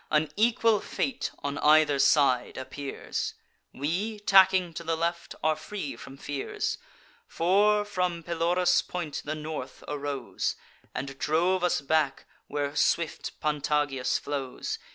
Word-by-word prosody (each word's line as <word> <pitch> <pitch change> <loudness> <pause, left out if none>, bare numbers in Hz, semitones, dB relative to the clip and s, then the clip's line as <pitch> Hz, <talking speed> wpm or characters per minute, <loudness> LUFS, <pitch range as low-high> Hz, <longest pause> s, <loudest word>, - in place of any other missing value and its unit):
An 155 0 +2
equal 225 0 +3
fate 260 +4 -2
on 140 0 -2
either 150 -2 +5
side 135 -3 +3
appears: 135 +1 -4 0.4
We, 180 +11 -2
tacking 190 -3 +5
to 170 - -6
the 165 0 0
left, 170 +1 -2
are 155 0 +3
free 155 -1 -5
from 135 - -11
fears; 145 - -3 0.5
For, 205 +4 +3
from 180 -4 -1
Pelorus' 175 +2 +2
point, 175 -5 -4
the 155 +1 -3
North 155 0 -6
arose, 145 -3 -2 0.4
And 135 0 -5
drove 175 +6 +2
us 180 - +2
back 145 -1 +1 0.2
where 145 0 -2
swift 165 -2 0
Pantagias 145 -3 +1
flows. 140 -3 -4
155 Hz, 125 wpm, -28 LUFS, 145-180 Hz, 0.5 s, either